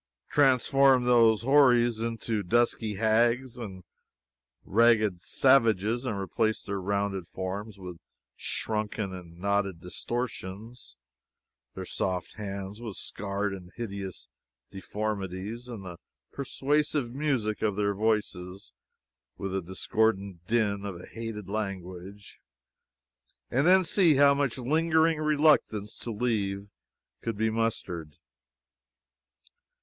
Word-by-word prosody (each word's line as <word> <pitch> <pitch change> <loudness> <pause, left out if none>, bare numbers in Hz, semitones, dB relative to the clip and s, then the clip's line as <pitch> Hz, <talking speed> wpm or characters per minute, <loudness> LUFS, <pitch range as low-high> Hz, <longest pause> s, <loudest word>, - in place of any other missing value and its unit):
Transform 135 -1 +4
those 115 -3 +4
houris 120 -4 +5
into 115 -1 -2
dusky 110 +1 +1
hags 115 +4 +2
and 95 -5 -7 0.8
ragged 110 -4 +3
savages, 115 -1 +3
and 110 -5 -2
replace 110 +3 -1
their 100 -1 -3
rounded 100 -2 -1
forms 100 +3 -5
with 90 -3 -9 0.4
shrunken 105 -2 -2
and 85 -2 -10
knotted 100 -1 0
distortions, 110 - -6 0.8
their - - -5
soft 90 -1 -2
hands 100 0 -6
with 110 -5 -6
scarred 100 +1 -3
and 90 -2 -9
hideous 100 -5 -6 0.4
deformities, 105 +2 -4
and 110 -6 -8
the 90 -2 -8 0.3
persuasive 140 -1 0
music 130 -7 -1
of 105 -3 +1
their 100 0 +1
voices 100 -3 -2 0.6
with 95 - -4
the 95 0 -1
discordant 95 0 -1
din 105 -3 +1
of 100 -4 -5
a - - -10
hated 115 -3 -7
language, 100 -1 -6 1.1
and 135 +6 +2
then 185 +1 +6
see 170 -2 +4
how 140 +1 +6
much 140 -3 0
lingering 160 +4 +2
reluctance 145 -9 +2
to - - -5
leave 105 -3 -2 0.5
could 115 -3 -3
be 110 +1 +1
mustered. 95 -9 -2
110 Hz, 110 wpm, -28 LUFS, 95-120 Hz, 1.1 s, then